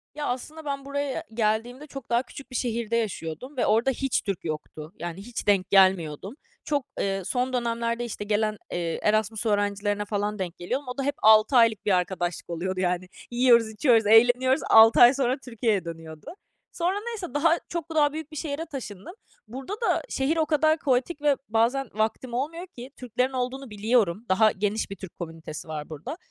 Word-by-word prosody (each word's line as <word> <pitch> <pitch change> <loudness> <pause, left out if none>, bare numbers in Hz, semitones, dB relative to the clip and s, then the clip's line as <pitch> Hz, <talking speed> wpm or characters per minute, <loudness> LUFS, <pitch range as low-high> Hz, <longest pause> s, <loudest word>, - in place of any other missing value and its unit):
Ya, 295 - -3
aslında 300 +6 -5
ben 275 -1 -4
buraya 280 -1 -3
geldiğimde 230 +6 -1
çok 275 -3 -9
daha 240 +2 +2
küçük 275 -1 -12
bir - - -7
şehirde 230 -2 -1
yaşıyordum 220 - -4
ve - - +2
orada 230 +5 +3
hiç 270 0 -1
Türk 195 -4 -4
yoktu. 155 +1 -6
Yani, 175 +1 -5
hiç 235 +1 -7
denk 195 -2 +3
gelmiyordum. 190 -1 +3 0.3
Çok, 285 -3 -1
ııı, 195 -1 -1
son 255 +3 -1
dönemlerde 235 0 -1
işte 205 -2 -5
gelen, 215 +1 +1 0.2
ııı, 170 -2 -2
Erasmus 215 +1 0
öğrencilerine 205 0 0
falan 205 0 -2
denk 180 -3 -4
geliyordum. 255 +10 -3
O 250 - -6
da 275 - -1
hep 285 +1 -1
6 220 +4 +6
aylık 230 -3 +4
bir 205 - +2
arkadaşlık 180 -1 -1
oluyordu, 185 +2 -3
yani. 180 0 -1 0.2
Yiyoruz, 240 -2 +4
içiyoruz, 225 -1 +3
eğleniyoruz, 245 +5 +5
6 225 +1 +8
ay 240 +2 +9
sonra 260 0 0
Türkiye'ye 225 -6 -1
dönüyordu. 160 -2 -9 0.5
Sonra 360 +3 -1
neyse, 415 -7 -5
daha 325 +3 +3
çok 340 -2 -4
daha 295 -1 +3
büyük 315 -1 -6
bir 310 - -8
şehre 310 +1 -3
taşındım. 235 - -8 0.3
Burada 265 - -7
da - - +1
şehir 280 +5 0
o 315 - +2
kadar 310 +1 +2
kaotik 280 +3 0
ve 290 -2 +3
bazen 235 +4 +1
vaktim 220 +3 -2
olmuyor 325 +8 -3
ki 255 -6 -11
Türklerin 250 +2 -1
olduğunu 255 0 -3
biliyorum. 210 -1 +1
Daha 215 +3 +5
geniş 205 +2 -2
bir - - -4
Türk 190 -1 -10
komünitesi 165 -2 -7
var 150 -1 -6
burada 155 - -7
230 Hz, 180 wpm, -26 LUFS, 200-270 Hz, 0.5 s, ay